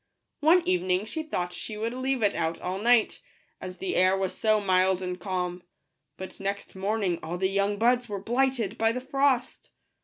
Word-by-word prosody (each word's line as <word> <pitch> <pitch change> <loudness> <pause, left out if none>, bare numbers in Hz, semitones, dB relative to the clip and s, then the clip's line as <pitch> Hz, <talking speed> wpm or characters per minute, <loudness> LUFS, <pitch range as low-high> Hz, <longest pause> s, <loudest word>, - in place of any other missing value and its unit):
One 330 +4 +4
evening 185 +2 +1
she 315 +8 -4
thought 180 - -3
she 215 +4 -5
would 225 +2 -2
leave 260 -1 -1
it 205 - +3
out 165 0 -2
all 185 +1 -3
night, 235 +1 +3 0.4
as 185 0 -7
the 190 +1 -3
air 185 +1 +4
was 190 -1 -2
so 215 -1 +2
mild 185 -1 +2
and 180 0 -4
calm; 180 -2 -3 0.6
but 190 - -8
next 200 0 -4
morning 195 -2 -1
all 165 +3 -4
the 190 +1 +1
young 200 +1 0
buds 240 +2 +2
were 205 - -3
blighted 240 -1 0
by 225 0 +3
the 250 - -3
frost. 270 -1 0
200 Hz, 185 wpm, -27 LUFS, 185-240 Hz, 0.6 s, One